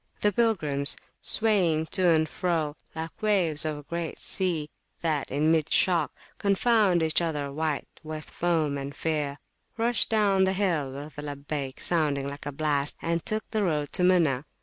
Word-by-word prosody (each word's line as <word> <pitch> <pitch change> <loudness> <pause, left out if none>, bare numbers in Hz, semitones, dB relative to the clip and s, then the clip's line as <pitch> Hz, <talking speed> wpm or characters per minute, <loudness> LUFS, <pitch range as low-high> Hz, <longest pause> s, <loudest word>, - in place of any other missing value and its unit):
The 210 - +3
pilgrims, 155 -11 +2 0.2
swaying 185 -8 +2
to 185 -3 +3
and 160 -1 +3
fro, 160 -4 -1 0.2
Like 160 0 -6
waves 180 -8 +4
of 155 -1 -2
a 145 - -10
great 170 +2 -4
sea, 165 -6 -1 0.3
that 155 -4 -1
in 150 +4 +2
mid 160 -1 +1
shock 180 -3 +3 0.3
Confound 200 -3 +3
each 160 +1 +2
other, 150 -4 -2
white 155 0 -2
with 155 -1 -7
foam 160 -5 0
and 140 +1 -6
fear, 150 -3 -2 0.4
rushed 235 0 +2
down 200 -3 +3
the 190 - +1
hill 175 -9 0
with 145 +2 -8
a - - -3
Labbayk 140 -2 -5
sounding 145 -5 0
like 140 +1 -7
a - - -2
blast, 145 0 -1
and 165 -1 -1
took 215 0 -2
the 220 -1 0
road 150 -6 0
to - - 0
Muna. 165 -7 +3
160 Hz, 170 wpm, -27 LUFS, 145-185 Hz, 0.4 s, waves